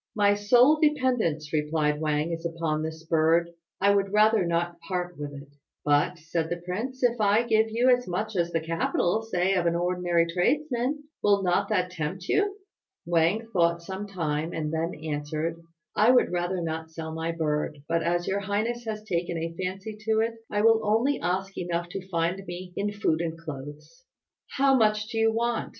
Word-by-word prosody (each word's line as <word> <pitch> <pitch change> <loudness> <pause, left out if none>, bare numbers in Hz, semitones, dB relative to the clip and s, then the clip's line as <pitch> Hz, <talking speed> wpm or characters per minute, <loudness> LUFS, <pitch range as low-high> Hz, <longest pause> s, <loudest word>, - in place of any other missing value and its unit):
"My 205 -1 +4
sole 245 +9 +5
dependence," 250 - +1
replied 150 0 0
Wang, 155 +1 0
"is 165 0 -4
upon 165 -2 -2
this 160 +1 -6
bird. 165 +1 +2 0.3
I 200 +1 +4
would 195 -1 +1
rather 210 -2 +4
not 170 0 -1
part 180 0 -4
with 145 -1 -6
it." 140 0 -10 0.4
"But," 145 +4 +2
said 165 0 -3
the 175 - -2
prince, 245 +9 -4
"if 240 -2 +2
I 210 +3 +4
give 220 -1 +2
you 235 +3 +1
as 245 0 -8
much 210 +4 -3
as 170 -1 0
the 165 - 0
capital, 165 +5 0
say 190 -4 0
of 180 -3 +1
an 170 - +1
ordinary 175 -1 +1
tradesman, 255 - 0 0.2
will 200 -1 +3
not 185 +2 +1
that 180 -4 0
tempt 180 +3 -4
you?" 405 -1 +1 0.5
Wang 170 +6 +2
thought 170 -1 +2
some 190 +3 -5
time, 160 -4 -2
and 155 -1 -3
then 165 +2 -1
answered, 155 +2 -3 0.3
"I 215 +3 +5
would 250 0 +4
rather 175 0 -1
not 160 0 -4
sell 160 0 -6
my 160 +1 -2
bird; 150 -2 -1
but 165 0 +1
as 175 +1 0
your 195 +1 0
highness 215 +4 -2
has 215 -1 -4
taken 170 -4 -2
a 165 +1 -3
fancy 195 +4 -4
to 220 0 +3
it 230 +1 0 0.2
I 205 - 0
will 225 0 +5
only 230 +7 +2
ask 190 +2 -2
enough 175 -1 -2
to 190 0 -7
find 170 +2 -1
me 180 +1 -7
in 205 +1 -1
food 185 -6 0
and 165 -1 -3
clothes." 150 - -9 0.5
"How 270 0 +5
much 215 -2 +2
do 225 - -2
you 225 0 +4
want?" 235 +1 -1
180 Hz, 185 wpm, -27 LUFS, 165-215 Hz, 0.5 s, sole